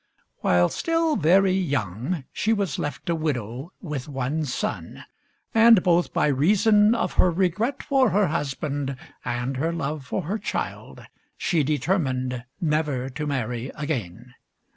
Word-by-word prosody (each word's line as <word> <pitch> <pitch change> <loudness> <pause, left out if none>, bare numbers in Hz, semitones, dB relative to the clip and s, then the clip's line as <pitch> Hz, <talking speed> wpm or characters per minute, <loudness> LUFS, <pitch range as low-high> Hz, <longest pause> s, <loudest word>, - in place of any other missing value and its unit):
While 90 0 +3
still 330 -2 0
very 185 +5 +4
young, 140 - -1
she 220 - +1
was 200 -7 -1
left 145 - -4
a 170 - +2
widow 135 - -3
with 150 -5 -5
one 140 +3 -2
son; 125 - -4 0.5
and, 225 -3 +7
both 175 -1 +2
by - - +1
reason 205 - +4
of - - -1
her 185 - +4
regret 190 +9 0
for 265 -3 +3
her 200 -3 +2
husband 140 -1 -2 0.3
and 125 +2 -2
her 160 +5 0
love 155 -3 -3
for 155 +8 -3
her 200 +8 -2
child, - - -5 0.3
she 170 -5 +1
determined 135 -5 -1
never 150 -5 0
to 150 +3 -4
marry 125 -2 -2
again. 125 - -4
150 Hz, 140 wpm, -24 LUFS, 130-185 Hz, 0.5 s, and